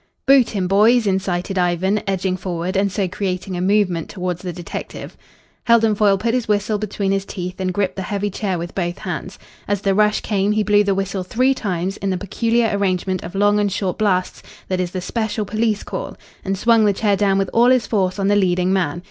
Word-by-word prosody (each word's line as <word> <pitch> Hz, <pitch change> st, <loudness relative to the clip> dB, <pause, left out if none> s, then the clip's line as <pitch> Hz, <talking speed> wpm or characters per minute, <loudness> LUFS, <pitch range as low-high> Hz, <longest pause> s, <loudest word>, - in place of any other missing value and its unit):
"Boot 270 Hz, -3 st, +5 dB
him, 190 Hz, -4 st, -2 dB
boys," 220 Hz, +5 st, +4 dB
incited 190 Hz, -1 st, -1 dB
Ivan, 180 Hz, +4 st, +1 dB
edging 190 Hz, -1 st, 0 dB
forward 180 Hz, -1 st, -4 dB
and 195 Hz, 0 st, +1 dB
so 195 Hz, -1 st, -1 dB
creating 185 Hz, 0 st, -3 dB
a 175 Hz, -, -3 dB
movement 185 Hz, -4 st, +1 dB
towards 180 Hz, -3 st, -4 dB
the 180 Hz, -, -4 dB
detective. 175 Hz, -1 st, -7 dB, 0.5 s
Heldon 225 Hz, -2 st, +4 dB
Foyle 205 Hz, -1 st, +3 dB
put 230 Hz, +4 st, -1 dB
his 250 Hz, -2 st, -1 dB
whistle 210 Hz, 0 st, 0 dB
between 200 Hz, -1 st, -2 dB
his 195 Hz, 0 st, 0 dB
teeth 180 Hz, -2 st, -6 dB
and 185 Hz, -1 st, -1 dB
gripped 195 Hz, +1 st, -1 dB
the -, -, -2 dB
heavy 205 Hz, +2 st, -2 dB
chair 190 Hz, -2 st, -2 dB
with 170 Hz, +1 st, -6 dB
both 175 Hz, -1 st, -2 dB
hands. -, -, -6 dB, 0.3 s
As 205 Hz, -1 st, -1 dB
the 195 Hz, -1 st, +1 dB
rush 210 Hz, +1 st, +2 dB
came 205 Hz, -1 st, 0 dB
he 215 Hz, 0 st, +1 dB
blew 205 Hz, 0 st, +4 dB
the 200 Hz, -1 st, +1 dB
whistle 195 Hz, 0 st, -2 dB
three 255 Hz, +8 st, +1 dB
times 190 Hz, -5 st, -3 dB
in 195 Hz, -, -3 dB
the 185 Hz, -, 0 dB
peculiar 225 Hz, +3 st, 0 dB
arrangement 185 Hz, -2 st, -1 dB
of 175 Hz, -, -8 dB
long 205 Hz, +1 st, +3 dB
and 205 Hz, -1 st, +1 dB
short 190 Hz, 0 st, -2 dB
blasts 185 Hz, -4 st, 0 dB, 0.3 s
that 185 Hz, -1 st, -1 dB
is 180 Hz, -1 st, -1 dB
the 185 Hz, +1 st, -5 dB
special 220 Hz, +1 st, -2 dB
police 215 Hz, 0 st, -1 dB
call, -, -, -6 dB, 0.3 s
and 195 Hz, 0 st, -2 dB
swung 230 Hz, +2 st, +4 dB
the 205 Hz, -, +3 dB
chair 205 Hz, 0 st, +1 dB
down 195 Hz, -1 st, +2 dB
with 195 Hz, -1 st, -1 dB
all 240 Hz, +2 st, +5 dB
his 255 Hz, -4 st, +3 dB
force 190 Hz, -3 st, 0 dB
on 195 Hz, -1 st, 0 dB
the 205 Hz, -, +3 dB
leading 185 Hz, -1 st, +2 dB
man. 175 Hz, -4 st, 0 dB
195 Hz, 215 wpm, -20 LUFS, 185-210 Hz, 0.5 s, Boot